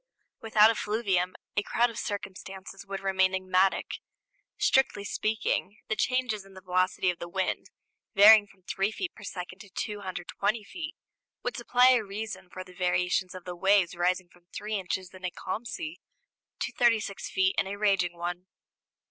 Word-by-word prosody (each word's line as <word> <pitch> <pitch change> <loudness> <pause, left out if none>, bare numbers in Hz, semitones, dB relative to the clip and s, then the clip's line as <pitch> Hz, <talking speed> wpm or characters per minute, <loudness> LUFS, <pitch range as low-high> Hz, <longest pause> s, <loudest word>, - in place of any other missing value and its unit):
Without 220 0 +6
effluvium 205 -5 0 0.2
a 205 - +3
crowd 235 +3 +2
of 230 - -6
circumstances 195 -1 -6
would 195 0 -4
remain 190 -1 +2
enigmatic. 185 0 +1 0.6
Strictly 265 -6 +3
speaking, 215 -1 -1
the 220 - +1
changes 245 -2 0
in 195 0 -17
the 190 - -10
velocity 185 0 +1
of 175 - -11
the 170 - -6
wind, 190 +1 -1 0.5
varying 210 +1 +9
from 195 -2 -23
3 195 +2 0
feet 355 +10 -4
per - - -15
second 185 -1 -6
to 205 - -12
220 205 +2 -3
feet, 330 - -7 0.5
would - - -2
supply 250 0 +5
a 245 -3 +3
reason 205 -1 -6
for 185 - -7
the 185 0 -15
variations 180 0 0
of 185 - -9
the 180 -1 -5
waves 190 0 +3
rising 180 +1 0
from 175 0 -24
3 210 +1 -5
inches 190 -2 -3
in 185 0 -13
a 180 - 0
calm 195 +6 -5
sea 315 +7 -5 0.6
to - - -1
36 225 -4 +1
feet 190 0 +2
in 190 - +1
a 200 - -4
raging 195 -4 +2
one. 175 +1 -4
195 Hz, 165 wpm, -29 LUFS, 185-215 Hz, 0.6 s, varying